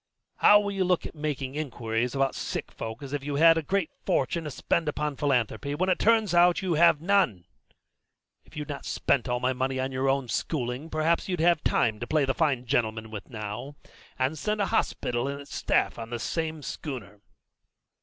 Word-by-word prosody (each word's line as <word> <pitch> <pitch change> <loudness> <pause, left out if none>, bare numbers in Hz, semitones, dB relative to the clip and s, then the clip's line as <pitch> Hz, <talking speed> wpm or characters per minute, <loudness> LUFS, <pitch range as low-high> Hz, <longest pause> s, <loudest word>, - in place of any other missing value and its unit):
How 205 - +7
will 205 -1 -2
you 195 -1 0
look 180 -1 0
making 145 -4 -3
inquiries 120 -5 -2
about 135 0 +1
sick - - -4
folk 110 +4 -7
as 140 0 -7
if 145 -1 -2
you 145 0 -3
had 165 +3 +7
a 165 - 0
great 190 +2 -1
fortune 160 +5 0
to - - -3
spend 155 +3 0
upon 150 -1 -2
philanthropy, 140 +1 0
when 185 +5 0
it 185 - +2
turns 220 -4 +3
out 175 0 +6
that - - -3
you 180 -2 0
have 165 -1 +5
none? 170 - +2 1.0
If - - -16
you'd 150 - -4
not 145 -2 -6
spent 125 -2 0
all 125 0 0
my 130 +1 +1
money 130 +1 -1
on 130 +1 -1
your 130 +1 0
own 135 -1 +1
schooling, 125 +3 -2
perhaps 160 +4 0
you'd 180 -2 -1
have 170 -1 +3
some 110 -2 +1
to 120 - -5
play 155 -3 +2
the 135 - 0
fine 140 -6 0
gentleman 110 -3 -1
with 105 -3 -7
now, 115 +5 -6 0.4
and 135 +4 0
send 210 0 -1
a 200 - +2
hospital 120 +1 0
and 140 0 -4
its 140 - -12
staff - - +1
on 115 0 -6
this 120 -1 -4
same 160 -2 -3
schooner." 115 -11 -7
140 Hz, 205 wpm, -27 LUFS, 125-165 Hz, 1.0 s, How